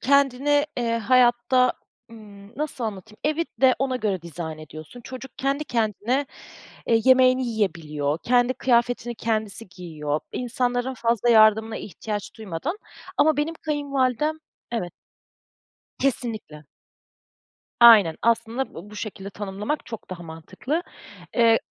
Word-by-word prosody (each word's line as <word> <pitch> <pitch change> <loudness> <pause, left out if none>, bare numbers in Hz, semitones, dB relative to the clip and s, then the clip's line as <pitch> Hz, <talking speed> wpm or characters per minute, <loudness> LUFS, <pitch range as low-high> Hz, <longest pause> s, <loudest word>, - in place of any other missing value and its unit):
Kendine, 280 +2 +3
eee, 230 -2 0
hayatta, 250 +2 +4 0.4
ımm, 210 -1 -14
nasıl 295 -5 -3
anlatayım, 215 0 -6
evi 310 +2 +1 0.2
de 260 -1 +6
ona 260 -1 0
göre 200 -7 -2
dizayn 165 -1 -6
ediyorsun, 155 +8 -11
çocuk 260 +1 -9
kendi 275 +3 0
kendine 235 +3 0 0.6
e, 230 - +3
yemeğini 255 0 +5
yiyebiliyor, 160 -9 -1
kendi 245 +1 +3
kıyafetini 240 -1 +1
kendisi 220 -2 -3
giyiyor, 155 -5 -4
insanların 245 +1 -1
fazla 235 -1 0
yardımına 220 0 +5
ihtiyaç 210 +1 -6
duymadan, 220 - -4 0.4
ama 310 -1 +4
benim 310 +3 -1
kayınvalidem 290 -1 -1 0.4
evet, 180 -7 -3 1.1
kesinlikle, 225 - -2 1.2
aynen, 210 -9 +8
aslında 235 +3 0
bu 190 +5 -10
bu 210 - -10
şekilde 200 -2 -6
tanımlamak 205 +9 -4
çok 225 -5 -9
daha 175 -1 -6
mantıklı. 180 - -4 0.5
Iıı, 230 -1 +5
230 Hz, 115 wpm, -24 LUFS, 200-260 Hz, 1.2 s, aynen